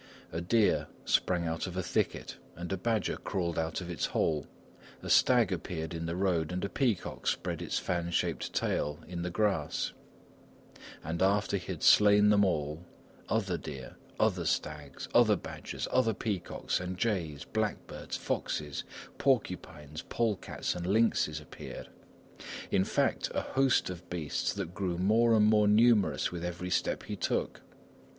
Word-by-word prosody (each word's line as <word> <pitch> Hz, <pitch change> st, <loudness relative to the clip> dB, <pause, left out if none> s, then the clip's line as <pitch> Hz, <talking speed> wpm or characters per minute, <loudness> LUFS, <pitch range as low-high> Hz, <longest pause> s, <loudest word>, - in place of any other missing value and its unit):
A 85 Hz, -, -3 dB
deer 105 Hz, +5 st, +2 dB, 0.2 s
sprang 90 Hz, -2 st, +2 dB
out 80 Hz, +3 st, -2 dB
of 90 Hz, -, -6 dB
the 95 Hz, -, -1 dB
thicket -, -, -1 dB, 0.2 s
and 85 Hz, +3 st, -4 dB
a -, -, +2 dB
badger 110 Hz, +1 st, 0 dB
crawled 85 Hz, -4 st, -2 dB
out 80 Hz, +3 st, -2 dB
of 90 Hz, -, -7 dB
its 85 Hz, -, -1 dB
hole, 75 Hz, -3 st, 0 dB, 0.6 s
a -, -, -2 dB
stag -, -, +5 dB
appeared 80 Hz, -1 st, -3 dB
in 85 Hz, 0 st, -3 dB
the 85 Hz, -, -2 dB
road, 90 Hz, -4 st, +1 dB
and 90 Hz, +2 st, -2 dB
a -, -, -3 dB
peacock 120 Hz, -9 st, -1 dB
spread -, -, -1 dB
its -, -, -2 dB
fan 85 Hz, -1 st, -1 dB
shaped 85 Hz, -, -1 dB
tail 75 Hz, 0 st, 0 dB
on 85 Hz, -1 st, -3 dB
the 90 Hz, -, -2 dB
grass 90 Hz, -6 st, 0 dB, 1.1 s
and 80 Hz, +3 st, -3 dB
after 100 Hz, +1 st, +2 dB
he 95 Hz, -, -6 dB
had -, -, -6 dB
slain 105 Hz, 0 st, +7 dB
them 105 Hz, -1 st, +5 dB
all, 75 Hz, -3 st, -1 dB, 0.5 s
other 95 Hz, -6 st, 0 dB
deer, 65 Hz, -3 st, -8 dB, 0.2 s
other -, -, +2 dB
stags, 75 Hz, -3 st, -3 dB
other -, -, +6 dB
badgers, -, -, -6 dB
other 115 Hz, -4 st, +3 dB
peacocks, 95 Hz, -4 st, -2 dB
and 90 Hz, 0 st, -4 dB
jays, 90 Hz, -9 st, -1 dB
blackbirds, -, -, -3 dB
foxes, 75 Hz, -2 st, -2 dB, 0.4 s
porcupines, 85 Hz, -, -1 dB
polecats, 110 Hz, -4 st, -1 dB
and 90 Hz, 0 st, -4 dB
lynxes, 100 Hz, -7 st, +2 dB
appeared; 75 Hz, -, -9 dB, 0.8 s
in 95 Hz, -, +3 dB
fact, -, -, 0 dB
a -, -, +2 dB
host 135 Hz, -7 st, +2 dB
of 90 Hz, 0 st, -10 dB
beasts 80 Hz, -5 st, -1 dB
that 85 Hz, -, -5 dB
grew 90 Hz, -1 st, -2 dB
more 110 Hz, +5 st, +4 dB
and 105 Hz, -1 st, +5 dB
more 105 Hz, -1 st, +5 dB
numerous 110 Hz, -1 st, +4 dB
with 85 Hz, -1 st, -5 dB
every 90 Hz, +1 st, -4 dB
step -, -, 0 dB
he -, -, -5 dB
took. -, -, -1 dB
90 Hz, 155 wpm, -31 LUFS, 85-105 Hz, 1.1 s, slain